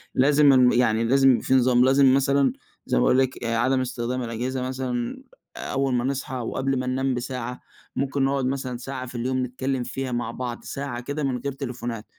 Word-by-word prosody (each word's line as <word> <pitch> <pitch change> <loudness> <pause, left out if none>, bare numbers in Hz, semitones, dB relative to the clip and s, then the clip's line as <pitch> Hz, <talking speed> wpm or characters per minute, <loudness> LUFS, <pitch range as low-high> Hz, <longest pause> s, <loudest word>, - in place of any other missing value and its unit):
لازم 145 +1 +5
الم 125 -1 +6
يعني 115 -2 +2
لازم 135 +1 +4
في - - -1
نظام، 125 -1 +4
لازم 135 0 +5
مثلًا 140 0 +3 0.3
زي - - 0
ما - - +3
باقول 130 - +4
لِك 130 -2 -1
آآ 115 0 0
عدم 130 +2 +2
استخدام 125 0 -3
الأجهزة 125 +3 -3
مثلًا 130 - -3 0.3
أول 135 -1 -1
ما 120 - +1
نصحى 135 +1 -3
وقبل 130 +2 -1
ما 130 - -3
ننام 130 +1 0
بساعة. 125 0 -4 0.4
ممكن 135 0 -1
نقعد 135 -1 0
مثلًا 130 -1 -2
ساعة 130 +1 -6
في 125 - -11
اليوم 130 +2 -1
نتكلم 130 +1 -2
فيها 130 +1 -4
مع 120 -1 -2
بعض، 120 -1 -5
ساعة 135 -3 -5
كده 145 +4 -4
من 130 -2 0
غير 140 +3 -4
تليفونات. 120 -4 -5
130 Hz, 190 wpm, -24 LUFS, 125-135 Hz, 0.4 s, الم